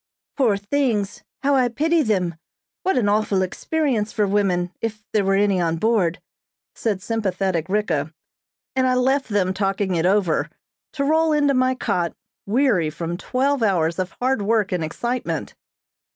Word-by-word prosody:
"Poor 235 -8 +2
things! 210 -2 -1 0.2
How 285 +1 +3
I 255 -2 +4
pity 315 +7 +1
them. 190 - 0 0.5
What 380 - +1
an 230 -5 +2
awful 205 -2 +2
experience 240 - -1
for 210 - +1
women 190 -3 +1
if 220 -1 -4
there 210 - +3
were 195 0 +2
any 200 -2 +2
on 165 -1 +1
board," 185 -3 +1 0.5
said 205 -5 -2
sympathetic 190 -6 -1
Ricka, 170 -8 0 0.6
and 260 0 +2
I 255 - +2
left 265 +1 +1
them 190 -3 +1
talking 195 0 -1
it 170 0 +2
over, 190 -5 +1 0.4
to 280 - -1
roll 315 +2 +3
into 290 -2 +3
my 255 0 +2
cot, 175 -8 -1 0.3
weary 210 - +2
from 165 +2 -4
twelve 265 +7 0
hours 170 -5 +1
of 185 0 -3
hard 260 -2 +1
work 210 -1 +1
and 180 -3 -1
excitement. 240 +10 -3
205 Hz, 155 wpm, -22 LUFS, 185-255 Hz, 0.6 s, I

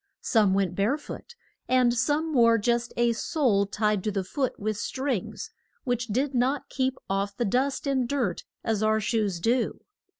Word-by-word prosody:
Some 210 -5 +3
went 195 -3 +1
bare 205 +10 +1
foot, 390 +9 -10 0.3
and 255 -2 +4
some 295 +6 0
wore 230 -3 +5
just 235 +2 0
a 240 0 +3
sole 225 -6 +1
tied 210 -1 0
to 215 - +1
the 195 -1 -1
foot 260 +7 -2
with 215 +1 -1
strings, 260 0 -3 0.3
which 245 -2 -1
did 260 +6 0
not 260 +3 0
keep 260 0 -1
off 200 +1 -2
the 240 - 0
dust 265 +8 0
and 260 -3 0
dirt 280 -4 -1 0.2
as 220 -2 0
our 215 0 +3
shoes 215 -4 0
do. 235 +7 0
235 Hz, 170 wpm, -27 LUFS, 210-260 Hz, 0.3 s, wore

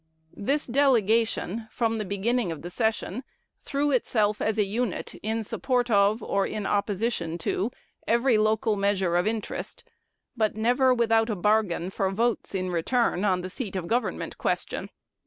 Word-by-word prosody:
This 280 +9 0
delegation, 230 -4 +2
from 225 -1 -1
the 215 - -2
beginning 200 +1 0
of 160 -2 -7
the 175 - -6
session, 220 +2 -1 0.4
threw 290 +1 -1
itself 215 -4 +1
as 220 0 0
a 210 - +3
unit 220 0 -2
in 220 +1 -1
support 245 +2 0
of, 205 +2 +3
or 195 0 0
in 210 -2 -4
opposition 200 -4 -1
to, 190 +5 -1 0.4
every 235 -1 +3
local 220 +1 +2
measure 195 -3 +1
of 175 +3 +2
interest, 220 -1 -4 0.5
but 215 -3 +1
never 245 +4 +3
without 225 -2 +3
a 215 - 0
bargain 195 -2 +1
for 195 0 0
votes 225 +1 -1
in 185 -1 -1
return 190 +3 +1
on 185 -3 +2
the 185 - -5
seat 205 -4 -5
of 185 -3 -2
government 240 +7 -2
question. - - -2
215 Hz, 155 wpm, -26 LUFS, 195-235 Hz, 0.5 s, a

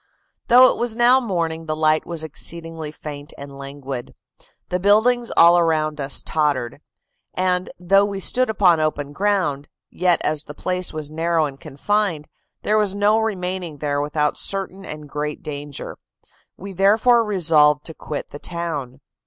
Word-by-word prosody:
"Though 250 +2 +7
it - - -5
was 235 -2 0
now 245 +2 +5
morning, 165 -8 -3
the 155 - -1
light 155 0 +1
was 170 -2 -3
exceedingly 165 0 -5
faint 150 -1 -9
and 140 0 -10
languid; 135 -2 -7 0.5
the 180 - -1
buildings 220 +5 +3
all 170 +1 +7
around 155 -3 0
us 135 0 +1
tottered; 145 -6 -1 0.5
and, 185 0 0
though 195 +3 +4
we 200 -1 -4
stood 255 +6 +2
upon 185 -6 +3
open 145 -2 -2
ground, 185 -8 0 0.2
yet 180 -1 +2
as 155 0 -1
the 145 - -10
place 180 +1 -1
was 155 -1 -6
narrow 165 0 +1
and 140 -2 -8
confined, 175 +1 -1 0.4
there 215 +1 +2
was 200 -2 0
no 205 +2 +3
remaining 185 -6 -3
there 145 0 -1
without 150 0 -1
certain 195 0 -3
and 150 -1 -8
great 150 +1 -5
danger: 145 -1 -7 0.6
we 195 +1 -8
therefore 220 +6 +4
resolved 155 -8 +3
to 160 - -7
quit 150 -1 -7
the 145 - -9
town. 145 -7 -4
165 Hz, 155 wpm, -21 LUFS, 150-195 Hz, 0.6 s, Though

